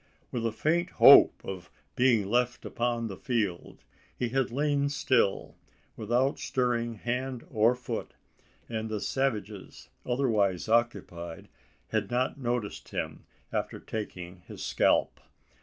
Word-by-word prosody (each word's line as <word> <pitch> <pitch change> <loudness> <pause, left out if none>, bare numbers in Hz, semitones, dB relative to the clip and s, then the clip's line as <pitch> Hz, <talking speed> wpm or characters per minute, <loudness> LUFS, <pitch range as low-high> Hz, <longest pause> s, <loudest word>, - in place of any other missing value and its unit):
With 115 -2 -1
a - - -1
faint 170 +9 0
hope - - +8
of 95 -2 -7 0.3
being 120 -6 +3
left 120 +2 0
upon 120 -1 -1
the 100 - -6
field, 105 -8 -3 0.3
he 120 - -1
had 130 +1 0
lain 140 +2 +1
still, 130 -7 +1 0.4
without 120 +5 0
stirring 120 -2 -1
hand 125 +3 -3
or 115 +2 +3
foot; 125 -2 -6 0.5
and 110 -1 -4
the 110 -1 -2
savages, 105 - -3
otherwise 110 -8 +1
occupied, 100 -8 -1 0.4
had 110 -2 -1
not 125 +3 -1
noticed 120 -4 -3
him - - -5 0.3
after - - -2
taking 90 -5 -6
his - - -8
scalp. - - +2
120 Hz, 125 wpm, -29 LUFS, 105-125 Hz, 0.5 s, hope